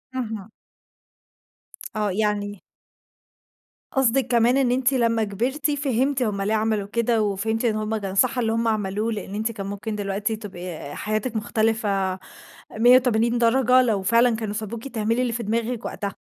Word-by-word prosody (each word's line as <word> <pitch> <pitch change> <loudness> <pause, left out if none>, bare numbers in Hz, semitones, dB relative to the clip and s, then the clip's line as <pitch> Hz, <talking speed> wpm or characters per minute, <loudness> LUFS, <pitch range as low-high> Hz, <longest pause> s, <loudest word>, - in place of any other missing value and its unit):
اهم. 220 -5 -4 1.5
آه 210 -2 0
يعني 205 0 -1 1.3
قصدِك 265 0 +2
كمان 240 +2 +3
إن 260 -3 +2
أنتِ 255 +1 +2
لمّا 230 -3 +2
كبرتِ 245 +9 -1
فهمتِ 275 -1 0
هُم 205 -4 -1
ليه 205 +2 0
عملوا 215 -2 0
كده 235 +1 +1
وفهمتِ 215 +3 -1
إن 225 -2 +2
هُم 215 +1 -1
كان 195 -2 -5
صح 255 +6 +3
اللي 225 -2 +1
هُم 230 +1 0
عملوه، 215 0 -1
لأن 205 -2 -5
أنتِ 220 +2 -1
كان 200 -3 -6
ممكن 205 +2 -4
دلوقتي 205 +2 -2
تبقي 195 -5 -8
آآ 145 -1 -8
حياتِك 215 +3 -2
مختلفة، 215 -4 0 0.6
180° 240 -1 +4
درجة، 250 +2 +4
لو 220 -6 +1
فعلًا 230 +3 +4
كانوا 220 -2 -4
سابوكِ 220 +3 -5
تعملي 230 -1 0
اللي 245 -2 0
في 235 +1 -3
دماغِك 230 +2 -2
وقتها. 200 -2 -4
220 Hz, 155 wpm, -23 LUFS, 205-240 Hz, 1.5 s, 180°